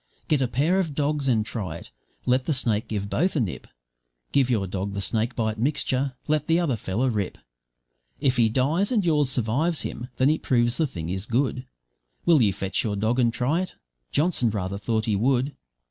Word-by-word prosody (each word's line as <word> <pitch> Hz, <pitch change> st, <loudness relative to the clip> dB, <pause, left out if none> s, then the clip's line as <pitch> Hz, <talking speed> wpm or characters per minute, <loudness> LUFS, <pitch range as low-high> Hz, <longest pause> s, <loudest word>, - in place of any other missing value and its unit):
Get 150 Hz, -3 st, +2 dB
a 130 Hz, -, +2 dB
pair 150 Hz, +10 st, +2 dB
of 165 Hz, -7 st, -1 dB
dogs 145 Hz, -1 st, 0 dB
and 110 Hz, -4 st, +2 dB
try 95 Hz, -8 st, -4 dB
it, -, -, -13 dB, 0.3 s
let 130 Hz, +1 st, +2 dB
the 155 Hz, -, +2 dB
snake 115 Hz, -4 st, 0 dB
give 100 Hz, -2 st, -3 dB
both 175 Hz, -, 0 dB
a -, -, +2 dB
nip; 105 Hz, -8 st, -3 dB, 0.6 s
Give 135 Hz, -3 st, +3 dB
your 110 Hz, -6 st, +1 dB
dog 95 Hz, +1 st, -3 dB
the -, -, -2 dB
snakebite 110 Hz, +1 st, -1 dB
mixture, 135 Hz, 0 st, 0 dB
let 150 Hz, -1 st, +1 dB
the 165 Hz, +1 st, +3 dB
other 160 Hz, -8 st, +1 dB
fellow 110 Hz, +4 st, -1 dB
rip; 105 Hz, -6 st, -1 dB, 0.8 s
If 130 Hz, -2 st, +1 dB
he 115 Hz, -2 st, +4 dB
dies 150 Hz, -, +1 dB
and 215 Hz, -6 st, +2 dB
yours 150 Hz, -5 st, +3 dB
survives 135 Hz, +7 st, 0 dB
him, 120 Hz, +2 st, -5 dB
then 130 Hz, +3 st, +4 dB
it 155 Hz, -, -1 dB
proves 120 Hz, -1 st, +2 dB
the 160 Hz, -, +2 dB
thing 85 Hz, -, -6 dB
is 95 Hz, +3 st, -3 dB
good. 130 Hz, +1 st, 0 dB, 0.6 s
Will 165 Hz, -5 st, +5 dB
you 105 Hz, -4 st, +4 dB
fetch 95 Hz, 0 st, -2 dB
your 105 Hz, -3 st, -1 dB
dog 110 Hz, +5 st, +1 dB
and 120 Hz, -2 st, +4 dB
try 135 Hz, +9 st, 0 dB
it?' 185 Hz, -, -6 dB, 0.4 s
Johnson 150 Hz, -6 st, +2 dB
rather 100 Hz, -2 st, -3 dB
thought 110 Hz, 0 st, 0 dB
he 110 Hz, -, +1 dB
would. 130 Hz, +6 st, +1 dB
125 Hz, 200 wpm, -25 LUFS, 110-145 Hz, 0.8 s, Will